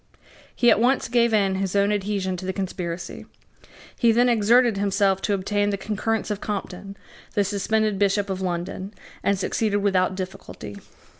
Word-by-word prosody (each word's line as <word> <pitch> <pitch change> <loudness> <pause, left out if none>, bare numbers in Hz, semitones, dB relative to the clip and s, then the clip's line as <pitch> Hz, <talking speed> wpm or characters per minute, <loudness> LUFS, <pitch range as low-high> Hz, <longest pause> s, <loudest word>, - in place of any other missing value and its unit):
He 240 - +5
at - - +4
once 250 +4 +2
gave 235 0 +2
in 200 -3 +2
his 195 0 -2
own 200 +1 +3
adhesion 200 -2 -1
to 185 - -7
the 190 - -1
conspiracy. 180 -3 -5 0.7
He 235 -2 +5
then 240 +2 +4
exerted 235 0 +4
himself 195 -1 +1
to 205 - +1
obtain 205 +2 0
the 200 - -1
concurrence 215 +2 -2
of 205 - -3
Compton, 195 -1 -5 0.4
the 205 - +3
suspended 210 +1 0
Bishop 200 0 +2
of 190 -1 -3
London, 185 +3 -4 0.3
and 200 0 +1
succeeded 205 +2 0
without 190 -2 +1
difficulty. 185 - -7
200 Hz, 160 wpm, -24 LUFS, 190-215 Hz, 0.7 s, He